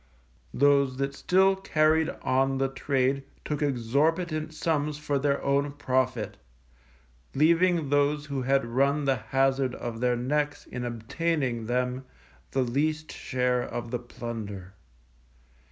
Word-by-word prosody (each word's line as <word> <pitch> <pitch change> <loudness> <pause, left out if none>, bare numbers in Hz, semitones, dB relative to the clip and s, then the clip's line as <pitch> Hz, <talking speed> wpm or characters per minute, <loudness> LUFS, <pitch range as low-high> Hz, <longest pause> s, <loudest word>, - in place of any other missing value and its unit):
Those 140 -1 +3
that 140 0 -1
still 190 +6 +3
carried 160 -4 +2
on 135 +1 +2
the 135 0 +1
trade 135 0 0 0.2
took 150 -1 -2
exorbitant 155 +5 0
sums 150 -2 -1
for 150 -2 -1
their 140 0 +1
own 140 +1 +1
profit, 130 -2 -1 1.0
leaving 165 0 +3
those 145 +1 +2
who 140 -3 -3
had 135 0 +2
run 140 +5 +1
the 135 -1 +2
hazard 135 +3 +1
of 115 -1 -5
their 125 0 +2
necks 145 +4 -1
in 125 0 -5
obtaining 120 0 -2
them, 125 +1 -1 0.4
the 135 - +1
least 155 +5 -1
share 125 -1 0
of 120 -1 -5
the 125 - -1
plunder. 110 -6 -7
135 Hz, 125 wpm, -27 LUFS, 125-150 Hz, 1.0 s, Those